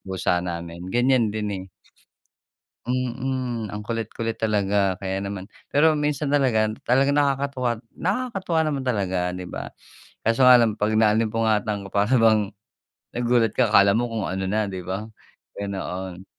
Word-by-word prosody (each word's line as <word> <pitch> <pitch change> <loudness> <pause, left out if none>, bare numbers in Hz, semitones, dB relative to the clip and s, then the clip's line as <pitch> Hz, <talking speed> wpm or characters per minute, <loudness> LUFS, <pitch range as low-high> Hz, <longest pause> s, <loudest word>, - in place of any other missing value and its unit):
pusa 90 -1 0
namin 85 -1 -6
ganyan 120 +1 +3
din, 105 0 -3
eh. 95 - -10 1.2
Mm. 125 -1 -2
Ang 105 0 -6
kulit-kulit 115 0 -4
talaga 100 -3 +1
kaya 95 0 -2
naman 100 0 -6 0.2
pero 155 +1 +3
minsan 150 -1 -1
talaga, 120 -7 +2 0.2
talagang 135 +3 +3
nakakatuwa 140 -3 0 0.3
nakakatuwa 190 -4 -1
naman 145 -4 -2
talaga, 100 -6 0 0.2
'di 90 - -6
ba? - - -7 0.5
Kaso 115 +3 +3
nga 125 - +9
lang, 110 -2 +1
pag 105 +1 +1
naalimpungatan 110 -1 +1
para 105 +5 +2
bang 110 -4 +4 0.7
nagulat 120 -2 +2
ka 120 -4 +2
akala 100 -1 +6
mo 120 +1 0
kung 110 -3 -2
ano 95 +1 -3
na, 105 +1 0
'di 95 -2 -6
ba? 95 +5 -4 0.5
Ganoon. 95 -2 -5
110 Hz, 140 wpm, -24 LUFS, 100-130 Hz, 1.2 s, nga